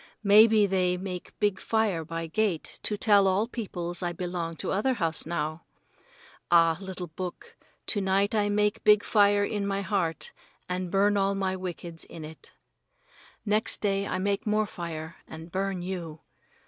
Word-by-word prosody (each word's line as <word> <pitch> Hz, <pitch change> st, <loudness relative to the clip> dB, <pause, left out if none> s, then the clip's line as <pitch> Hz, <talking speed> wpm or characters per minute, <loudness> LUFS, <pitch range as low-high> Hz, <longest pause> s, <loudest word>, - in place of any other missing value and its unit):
Maybe 215 Hz, +1 st, +7 dB
they 185 Hz, -2 st, +1 dB
make 180 Hz, -1 st, -7 dB
big 205 Hz, -2 st, +1 dB
fire 215 Hz, -7 st, 0 dB
by 165 Hz, +1 st, -4 dB
gate 175 Hz, 0 st, -1 dB
to 210 Hz, -, -1 dB
tell 205 Hz, -2 st, +5 dB
all 195 Hz, +4 st, +2 dB
peoples 175 Hz, -7 st, -5 dB
I 175 Hz, -1 st, -1 dB
belong 175 Hz, -1 st, -4 dB
to -, -, -2 dB
other 250 Hz, +7 st, +1 dB
house 165 Hz, -6 st, 0 dB
now. 155 Hz, -1 st, -3 dB, 0.8 s
Ah, 165 Hz, -1 st, +5 dB
little 190 Hz, -2 st, -6 dB
book, 175 Hz, +2 st, -7 dB, 0.3 s
to 205 Hz, -, 0 dB
night 195 Hz, +2 st, +2 dB
I 205 Hz, -1 st, +2 dB
make 210 Hz, +2 st, +1 dB
big 210 Hz, -1 st, +6 dB
fire 205 Hz, -1 st, +4 dB
in 205 Hz, -1 st, -2 dB
my 195 Hz, 0 st, -1 dB
heart 185 Hz, -5 st, -1 dB, 0.4 s
and 180 Hz, 0 st, -3 dB
burn 200 Hz, +2 st, +3 dB
all 195 Hz, 0 st, +1 dB
my 190 Hz, -1 st, -1 dB
wickeds 175 Hz, -2 st, -6 dB
in 160 Hz, -2 st, -9 dB
it. 160 Hz, +1 st, -11 dB, 0.9 s
Next 210 Hz, +1 st, +1 dB
day 200 Hz, -1 st, 0 dB
I -, -, -2 dB
make 200 Hz, +2 st, -1 dB
more 215 Hz, 0 st, +2 dB
fire 170 Hz, -3 st, -7 dB
and 160 Hz, +1 st, -10 dB
burn 190 Hz, -1 st, -2 dB
you. 170 Hz, -4 st, -5 dB
190 Hz, 160 wpm, -27 LUFS, 170-205 Hz, 0.9 s, Maybe